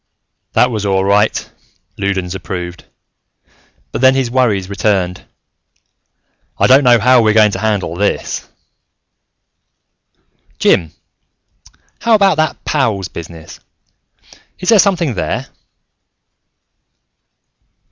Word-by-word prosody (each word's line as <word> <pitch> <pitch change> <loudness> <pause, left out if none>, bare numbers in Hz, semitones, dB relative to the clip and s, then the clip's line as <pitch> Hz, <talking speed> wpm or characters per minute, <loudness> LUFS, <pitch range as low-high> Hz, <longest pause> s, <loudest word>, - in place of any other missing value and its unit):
"That 125 - +3
was 110 -3 -3
all 95 -1 0
right," 105 +2 +1 0.5
Loudons 95 -2 -2
approved, 90 -2 -7 1.1
but - - -4
then 130 0 +5
his 130 -3 -1
worries 110 -7 +1
returned. 95 -3 -1 1.3
"I - - +2
don't 135 +3 +5
know 120 -2 +5
how 125 +2 +4
we're 110 -1 +2
going 105 -1 +5
to - - -4
handle 100 -6 -2
this 100 +3 -2 0.6
" - - -47
"Jim, 80 -3 +2 1.1
how 230 -1 +3
about 195 -5 +3
that 155 0 -2
pows 110 - -1
business? 85 -1 -10 1.0
Is 185 - -4
there 225 -3 +6
something 180 - +2
there?" 95 - -3
105 Hz, 105 wpm, -15 LUFS, 95-130 Hz, 1.3 s, there